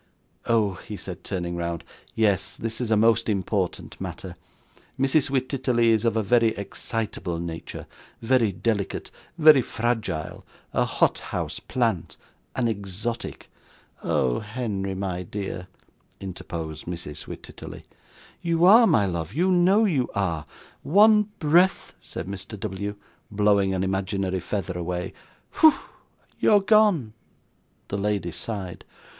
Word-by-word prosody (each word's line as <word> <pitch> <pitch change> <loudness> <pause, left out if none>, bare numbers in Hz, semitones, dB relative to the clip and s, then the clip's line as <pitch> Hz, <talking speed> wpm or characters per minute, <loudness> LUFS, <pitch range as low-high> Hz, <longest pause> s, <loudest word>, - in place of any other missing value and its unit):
'Oh!' 105 -5 +2
he 105 - -5
said, 90 -2 -7
turning 85 -3 -3
round, 85 -1 -3 0.3
'yes. 105 -4 +2
This 115 +1 -3
is 120 - -2
a 110 - +4
most 115 +1 +3
important 95 -2 -2
matter. - - -6 0.6
Mrs 135 +1 +3
Wititterly 130 -3 +1
is 110 0 +2
of 115 -1 +2
a 110 - +1
very 115 +1 +3
excitable 100 -3 -3
nature; 85 -1 -6 0.3
very 120 -2 +2
delicate, 100 +1 -2 0.3
very 155 -4 +8
fragile; 115 -9 -2 0.3
a - - +2
hothouse - - -1
plant, 115 - -1 0.4
an 125 -2 +1
exotic.' 110 +2 -4 0.5
'Oh! 60 -2 +1
Henry, 105 -4 -3
my 95 -2 -3
dear,' 95 -1 -5 0.5
interposed 85 -5 -6
Mrs. 85 -4 -6
Wititterly. - - -9 0.6
'You 170 0 +2
are, 225 +5 +8
my 105 - +4
love, 85 0 -3
you 180 +4 +2
know 185 +5 +4
you 140 - +1
are; 85 -6 -1 0.3
one 210 +4 +5
breath 175 +4 +3
' - - -37
said - - -7
Mr. 100 +2 -7
W., 100 +2 -4 0.3
blowing 100 -1 +3
an 95 - 0
imaginary 95 0 -1
feather 95 0 -3
away. 90 +1 -3 0.4
'Pho! 315 -2 +6 0.6
you're 210 - +5
gone!' 200 - +3 0.8
The 100 - -2
lady 100 -4 -1
sighed. 95 -2 -5
105 Hz, 125 wpm, -25 LUFS, 95-125 Hz, 0.8 s, very